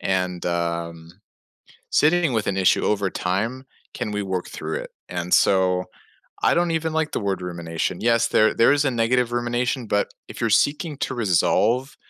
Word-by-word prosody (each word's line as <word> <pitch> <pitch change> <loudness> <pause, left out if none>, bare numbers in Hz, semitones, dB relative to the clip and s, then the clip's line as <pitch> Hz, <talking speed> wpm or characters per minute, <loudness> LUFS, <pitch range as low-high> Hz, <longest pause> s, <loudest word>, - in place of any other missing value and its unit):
and, 90 -2 -1
um 85 -1 -3 0.8
sitting 160 -2 +3
with 110 -2 -1
an 95 - -1
issue 95 -1 +3
over 100 -2 +1
time 115 +9 -2 0.3
can 105 - -3
we 105 - -2
work 95 -2 -3
through - - -5
it. - - -5 0.2
And 90 0 -4
so, 90 -1 +3 0.6
I - - +4
don't 170 -1 +1
even 160 0 -1
like 160 -1 0
the - - -2
word 100 -3 -2
rumination. 85 -1 -4
Yes. 115 0 +3
There 110 - +3
there 115 - +4
is 145 0 +2
a 135 - +2
negative 120 +1 +1
rumination, 120 0 -1
but 105 0 0 0.2
if - - -9
you're 115 - +1
seeking 145 - +1
to - - -2
resolve 120 - +1
110 Hz, 175 wpm, -23 LUFS, 90-125 Hz, 0.8 s, I